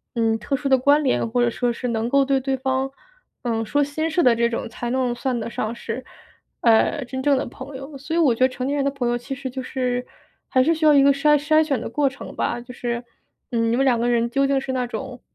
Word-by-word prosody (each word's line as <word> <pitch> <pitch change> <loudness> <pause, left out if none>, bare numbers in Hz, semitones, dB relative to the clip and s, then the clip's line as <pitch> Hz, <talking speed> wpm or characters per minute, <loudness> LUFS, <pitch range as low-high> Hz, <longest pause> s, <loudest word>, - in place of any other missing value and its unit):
嗯， 225 -1 +2
特 265 +6 -2
殊 280 - -3
的 265 - +5
关 285 +4 +4
联， 255 - +1
或 245 +2 +1
者 240 - +3
说 245 +1 -1
是 250 +2 -4
能 230 0 -1
够 275 +1 +3
对 270 -1 +1
对 265 0 -1
方， 265 0 -1 0.5
呃， 225 -2 -1
说 290 +7 +1
心 310 +3 -1
事 345 +2 +1
的 245 -5 +5
这 235 0 +2
种， 230 - -3
才 235 +1 -5
能 250 -1 0
算 245 0 -2
得 230 - -4
上 220 0 -3
是， 235 +2 -6 0.6
呃， 240 +4 +3
真 260 +1 -5
正 285 -2 +3
的 - - -1
朋 265 +3 -9
友。 275 +1 -9
所 290 +4 -6
以 340 - +2
我 265 -8 +4
觉 - - -11
得 - - +2
成 255 +1 -4
年 285 - 0
人 280 - 0
的 280 - +1
朋 265 -3 -2
友 240 0 +1
其 245 +3 -6
实 270 -1 -5
就 260 +1 -5
是 250 -1 -2 0.4
还 255 - +3
是 325 +5 +3
需 320 - -5
要 300 - +7
一 280 - +6
个 280 0 +5
筛 295 +2 +4
筛 310 +1 +4
选 280 -5 -1
的 - - -5
过 275 +3 +1
程 270 - -10
吧， 240 - -1
就 245 +1 -10
是， 235 -1 -3 0.5
嗯， 230 -1 +1
你 235 - +1
们 270 - +2
两 245 -3 +3
个 240 +1 0
人 235 0 +1
究 275 +3 +1
竟 275 0 +2
是 265 0 -4
那 250 -1 0
种， 255 0 -6
260 Hz, 295 characters per minute, -22 LUFS, 240-275 Hz, 0.6 s, 要